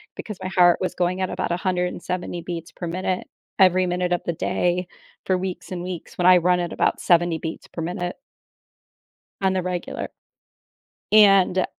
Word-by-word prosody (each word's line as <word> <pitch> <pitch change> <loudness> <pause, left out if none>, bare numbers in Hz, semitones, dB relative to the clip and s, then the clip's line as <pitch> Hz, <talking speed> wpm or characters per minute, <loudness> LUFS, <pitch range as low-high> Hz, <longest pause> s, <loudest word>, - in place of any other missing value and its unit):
because 215 -3 -7
my 185 - -3
heart 175 -1 +5
was 185 - -1
going 180 +1 0
at 185 - 0
about - - -2
170 180 0 -2
beats 170 -1 -6
per 175 - -7
minute, 185 +2 -2 0.3
every 185 -1 +5
minute 180 0 -1
of 175 - 0
the 170 - -1
day, 175 +2 0 0.4
for 185 - +2
weeks 180 -2 -5
and 180 -1 -4
weeks, 180 -2 -7
when 180 - +3
I 185 0 +8
run 180 +1 +2
at 175 -1 -3
about - - +1
70 175 -1 +3
beats 160 0 -6
per 165 - -7
minute 175 +1 -3 1.3
on 190 -1 +2
the 185 - 0
regular. 180 -1 -4 1.0
And 195 -3 +6
180 Hz, 170 wpm, -23 LUFS, 175-185 Hz, 1.3 s, I